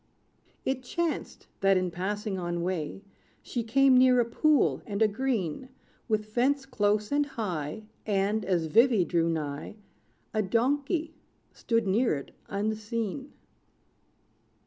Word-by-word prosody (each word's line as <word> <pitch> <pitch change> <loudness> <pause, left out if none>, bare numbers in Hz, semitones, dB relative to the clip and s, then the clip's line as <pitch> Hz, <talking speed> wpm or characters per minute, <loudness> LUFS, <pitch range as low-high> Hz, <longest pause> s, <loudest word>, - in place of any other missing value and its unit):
It 265 -1 0
chanced, 330 +6 -3
that, 195 -1 +4
in 185 -1 0
passing 195 +2 -3
on 175 -1 -2
way, 180 +1 -3 0.4
She 240 - -3
came 265 +4 +4
near 255 0 +6
a 240 - +3
pool, 295 +5 +2
and 200 -2 -3
a 220 - +5
green 225 - -2 0.4
With 215 -2 0
fence 260 +6 +1
close 210 -4 0
and 290 +1 +3
high; 185 - -4 0.2
And, 205 +1 +1
as 180 -4 +1
Vivy 220 +2 +4
drew 170 -1 +1
nigh, 150 +3 -3 0.6
A 215 - +2
donkey 285 - 0 0.4
stood 230 -2 0
near 205 0 +2
it 140 - -7 0.2
unseen. 220 +5 -3
215 Hz, 125 wpm, -28 LUFS, 190-255 Hz, 0.6 s, near